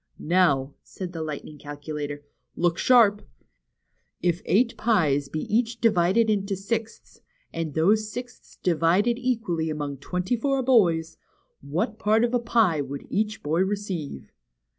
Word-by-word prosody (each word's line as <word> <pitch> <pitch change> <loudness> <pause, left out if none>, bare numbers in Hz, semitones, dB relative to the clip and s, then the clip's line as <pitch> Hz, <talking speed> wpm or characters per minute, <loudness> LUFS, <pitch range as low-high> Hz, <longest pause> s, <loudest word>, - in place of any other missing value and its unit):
'' - - -44 0.2
Now," 140 -6 +3
said 180 -2 -8
the 165 - -5
Lightning 150 -1 -6
Calcula 145 +1 -6
tor, 145 0 -7 0.3
look 175 -1 0
sharp! 220 -5 +5 1.0
If 175 +1 0
eight 235 +4 +2
pies 145 -11 +1
be 155 - -3
each 230 +2 0
divided 220 0 +3
into 200 -2 0
sixths, 225 +3 -5 0.3
and 165 -3 -4
those 210 +6 +2
sixths 245 0 -9
divided 180 +8 +2
equally 220 -11 -1
among 145 -2 -4
twenty 180 - -2
four 270 +2 0
boys, 170 -10 +3 0.4
what 170 +10 -3
part 220 +2 +3
of 240 0 0
a 245 - +3
pie 225 -9 +2
would 140 0 -6
each 215 +1 -1
boy 155 +3 0
receive 190 - -3
185 Hz, 140 wpm, -25 LUFS, 155-225 Hz, 1.0 s, sharp